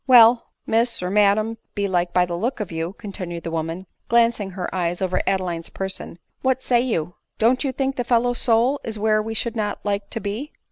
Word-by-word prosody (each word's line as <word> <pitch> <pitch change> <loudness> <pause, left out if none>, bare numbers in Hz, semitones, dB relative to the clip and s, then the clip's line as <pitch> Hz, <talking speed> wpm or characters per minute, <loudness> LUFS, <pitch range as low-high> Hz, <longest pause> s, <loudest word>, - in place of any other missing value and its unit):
" - - -48
Well, 240 -2 +7 0.2
miss, 230 -2 +1
or 180 - -2
madam, 210 +2 +3 0.2
belike, 185 -4 0
by 180 0 +3
the 175 -1 -4
look 240 +9 -2
of 205 -5 -4
you," 165 +2 -3
continued 185 -5 -6
the 165 - -4
woman, 165 +3 -3 0.2
gjancing 230 -4 +2
her 180 -1 -3
eye 175 -2 0
over 185 -1 0
Adeline's 180 -4 -1
person, 190 -3 -5
" - - -50
what 260 0 +1
say 240 -1 +3
you? 180 -9 -1 0.2
v 220 - +1
IJon't 255 +4 +4
you 275 - 0
think 270 +1 -2
the 245 - 0
fellow 240 0 +2
f - - -4
s - - 0
soul 245 +4 +3
is 220 -1 -4
where 215 0 +2
we 225 +1 -5
should 235 +1 -1
not 210 -2 -1
like 200 -1 -1
to - - -2
be 220 +9 -4
210 Hz, 230 wpm, -23 LUFS, 180-235 Hz, 0.2 s, Well